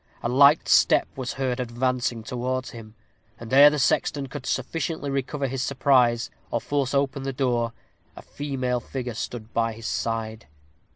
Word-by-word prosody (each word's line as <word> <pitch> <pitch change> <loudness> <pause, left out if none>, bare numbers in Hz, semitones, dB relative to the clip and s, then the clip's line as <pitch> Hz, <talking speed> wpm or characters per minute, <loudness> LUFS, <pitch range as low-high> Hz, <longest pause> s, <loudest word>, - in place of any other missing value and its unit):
A 120 - 0
light 140 +5 +5
step - - +4
was 130 -2 -4
heard 130 -2 -2
advancing 125 -1 -1
towards 130 +2 -3
him; 110 -2 -11 0.4
and 115 +1 -8
ere 140 +2 +9
the 150 - -2
sexton 140 +1 +1
could 135 - -8
sufficiently 150 +2 -2
recover 135 +1 -2
his 130 0 -3
surprise, 125 -3 +2 0.2
or 115 - -1
force 140 +1 -1
open 140 0 0
the 135 0 -3
door, 120 -3 0 0.4
a - - -11
female 130 -4 -3
figure 125 0 -5
stood 110 0 -6
by 115 -1 0
his 110 +1 -11
side. 115 -1 -3
130 Hz, 160 wpm, -25 LUFS, 120-135 Hz, 0.4 s, ere